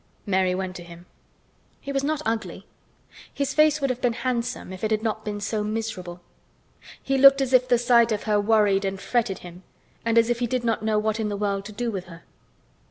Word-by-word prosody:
Mary 190 -2 +1
went 185 -1 -4
to 175 - -8
him. 170 0 -13 0.7
He 280 - -7
was 275 0 -1
not 305 +1 -1
ugly. 225 0 -3 0.7
His 280 -1 -2
face 305 0 +4
would 275 -2 0
have 255 0 -5
been 245 -2 +1
handsome 240 -4 -3
if 185 - -10
it 215 - +1
had 215 0 0
not 220 -1 -2
been 205 -1 -4
so 210 +1 -2
miserable. 210 -5 -5 0.8
He 270 0 0
looked 275 +1 +8
as 265 -1 -1
if 255 0 +5
the 245 - +4
sight 235 -1 +4
of 210 - -1
her 210 -2 +1
worried 205 -2 +3
and 195 0 -3
fretted 225 -3 -1
him 175 +1 -11 0.4
and 230 0 +1
as 230 +1 +4
if 235 - -1
he 245 - 0
did 250 +1 -2
not 230 -2 0
know 215 0 0
what 215 +1 0
in 215 -1 -1
the 205 - -3
world 200 -1 -2
to 215 - -8
do 235 +3 -3
with 190 -3 -5
her. 170 -1 -13
220 Hz, 225 wpm, -24 LUFS, 200-245 Hz, 0.8 s, looked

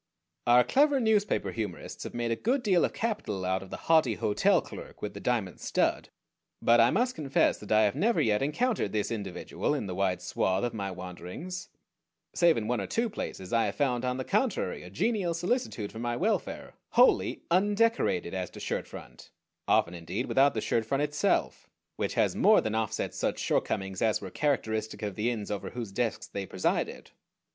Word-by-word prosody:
Our 120 +1 +7
clever 285 - +3
newspaper 220 -3 +1
humorists 110 -3 -5
have - - -7
made 120 -1 -1
a - - +2
good 245 - 0
deal 185 -6 +3
of - - -2
capital 200 - -2
out 95 0 0
of 95 - -10
the - - -6
haughty 155 -9 +4
hotel 105 - +3
clerk - - -10
with 105 -1 -3
the 100 - -7
diamond 110 -6 -1
stud; - - 0 0.5
but 120 0 +4
I 115 +1 +6
must 245 - +1
confess 140 - +1
that 105 - -10
I 110 0 +5
have 105 - +2
never 220 +10 +2
yet 105 -2 +2
encountered 150 - 0
this 105 0 -1
individual 105 - -2
in 135 - -3
the 95 - -4
wide 95 -1 0
swath 95 +1 0
of 120 - -1
my 100 -3 -3
wanderings. 95 - -7 0.6
Save 170 -4 +4
in 110 -2 -2
one 120 -2 0
or 95 - -4
two 230 -1 -1
places, 95 - -6
I 115 -1 +3
have - - -3
found 125 -4 0
on 125 0 -1
the 130 - -2
contrary 210 - 0
a 90 - -10
genial 180 - 0
solicitude 175 - -2
for 110 - -8
my 120 0 -1
welfare, 215 +5 -1 0.2
wholly - - +4
undecorated 205 - +2
as 95 -2 -3
to - - -11
shirt - - -3
front - - -11 0.4
often 85 - +3
indeed 90 +8 -4
without 135 0 +3
the 110 - -1
shirt 115 - 0
front 135 +6 0
itself 150 0 0 0.3
which - - -2
has - - +2
more - - +6
than 110 - -2
offset 110 -1 -1
such - - -1
shortcomings 95 -1 -1
as 110 -2 +2
were 95 -2 -8
characteristic 110 -7 -1
of 105 -2 -2
the 110 +5 0
inns 110 -4 -4
over 100 - -3
whose 115 -4 -6
desks 115 +2 -1
they 100 -1 -5
presided. 95 - -2
115 Hz, 195 wpm, -29 LUFS, -, 0.6 s, Our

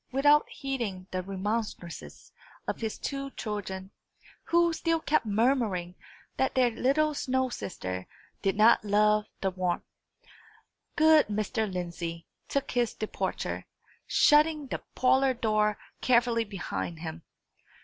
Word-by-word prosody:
Without 290 +3 +4
heeding 235 -10 -4
the 185 - -1
remonstrances 195 -2 -4 0.4
of - - -3
his 220 -1 -3
two 275 -1 -4
children, 195 -3 -4 0.5
who 340 0 +3
still 330 0 0
kept 305 -7 +1
murmuring 210 -5 +1 0.4
that 265 - +1
their 250 -2 +4
little 290 +6 +2
snow 260 -2 0
sister 95 - -5 0.3
did 195 -1 +1
not 215 +2 +5
love 210 +1 +3 0.2
the 190 - +1
warmth, 185 -1 -1 1.1
good 315 -1 +6
Mr. 215 0 -1
Lindsey 170 -2 -4 0.2
took 280 - -1
his 240 -2 0
departure, 215 - -3 0.4
shutting 300 0 +4
the 260 - -4
parlour 260 +1 +3
door 215 -2 +1 0.2
carefully 235 -2 +3
behind 175 -4 -5
him. 165 0 -6
220 Hz, 120 wpm, -29 LUFS, 190-270 Hz, 1.1 s, good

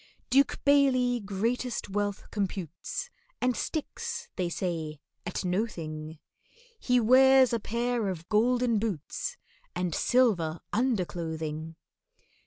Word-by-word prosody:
DUKE 275 +2 +3
BAILEY 260 -4 +4
greatest 225 +4 -2
wealth 205 0 -2
computes, 190 -5 -4 0.3
And 250 -1 +1
sticks, 470 +9 -4
they 180 -2 -1
say, 165 -4 -3 0.3
at 180 - -3
no 185 +6 +1
thing, 155 -5 -7 0.6
He 250 -1 +3
wears 260 +2 +6
a 230 - +1
pair 235 +1 -1
of 175 -3 -4
golden 235 +1 +2
boots 200 -9 -3 0.4
And 180 -2 -1
silver 175 -11 +2
underclothing. 165 -8 -2
210 Hz, 105 wpm, -29 LUFS, 170-250 Hz, 0.6 s, wears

